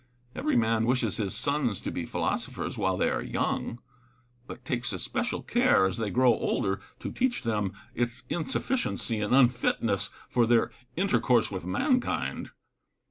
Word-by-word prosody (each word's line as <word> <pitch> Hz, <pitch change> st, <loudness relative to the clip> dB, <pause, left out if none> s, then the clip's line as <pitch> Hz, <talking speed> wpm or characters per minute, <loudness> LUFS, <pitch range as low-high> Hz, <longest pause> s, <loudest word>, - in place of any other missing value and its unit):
Every 150 Hz, -, 0 dB
man 115 Hz, -1 st, +2 dB
wishes 125 Hz, +1 st, +1 dB
his 100 Hz, -4 st, -2 dB
sons 140 Hz, -8 st, 0 dB
to -, -, -3 dB
be -, -, -4 dB
philosophers -, -, -2 dB
while -, -, 0 dB
they -, -, +2 dB
are -, -, -1 dB
young; 115 Hz, -, -2 dB, 0.7 s
but 125 Hz, -, -10 dB
takes 120 Hz, -2 st, -1 dB
especial 95 Hz, -, -2 dB
care, -, -, +4 dB
as 95 Hz, +4 st, -1 dB
they 110 Hz, -2 st, -1 dB
grow 125 Hz, +2 st, +4 dB
older, 100 Hz, -2 st, -1 dB, 0.2 s
to -, -, -4 dB
teach 250 Hz, -, 0 dB
them 105 Hz, -4 st, -1 dB, 0.2 s
its 120 Hz, +1 st, -2 dB
insufficiency 175 Hz, -, -1 dB
and 105 Hz, +4 st, +2 dB
unfitness 120 Hz, -5 st, +2 dB, 0.2 s
for 120 Hz, -2 st, +2 dB
their 115 Hz, 0 st, +3 dB, 0.3 s
inter 195 Hz, +2 st, +2 dB
course 120 Hz, -5 st, +3 dB
with 95 Hz, -3 st, -5 dB
mankind. 70 Hz, -7 st, 0 dB
120 Hz, 150 wpm, -28 LUFS, 105-125 Hz, 0.7 s, care